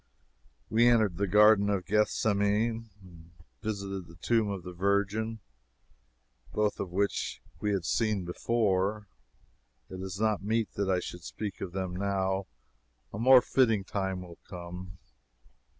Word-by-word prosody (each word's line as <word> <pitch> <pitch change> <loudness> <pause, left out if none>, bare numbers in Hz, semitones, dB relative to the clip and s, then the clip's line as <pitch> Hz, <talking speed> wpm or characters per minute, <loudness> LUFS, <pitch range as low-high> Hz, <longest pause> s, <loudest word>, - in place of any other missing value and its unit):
We 115 +2 +4
entered 110 -7 +3
the 100 +1 0
Garden 105 +1 +6
of 95 -3 0
Gethsemane, 105 +2 +1
and 85 -3 -15
we 80 - -20 0.2
visited 100 -4 -4
the 85 - -14
Tomb 110 +3 +1
of 100 -3 -4
the 90 - -7
Virgin, 100 +4 0 1.1
both 105 -1 0
of 90 - -4
which 100 +2 -1 0.2
we 105 0 0
had 95 -4 -1
seen 105 -3 0
before. 105 +1 0 0.9
It 95 0 -6
is 95 0 -5
not 110 -1 +1
meet 110 +2 -1
that 100 -1 -1
I 90 -1 +2
should 90 -1 -8
speak 105 +2 -6
of 90 - -5
them 95 -2 -3
now. 95 0 -1 0.7
A 100 - -5
more 130 +1 +7
fitting 115 -6 +2
time 95 -1 -3
will 85 -2 -12
come. 90 0 -8
100 Hz, 145 wpm, -29 LUFS, 95-110 Hz, 1.1 s, more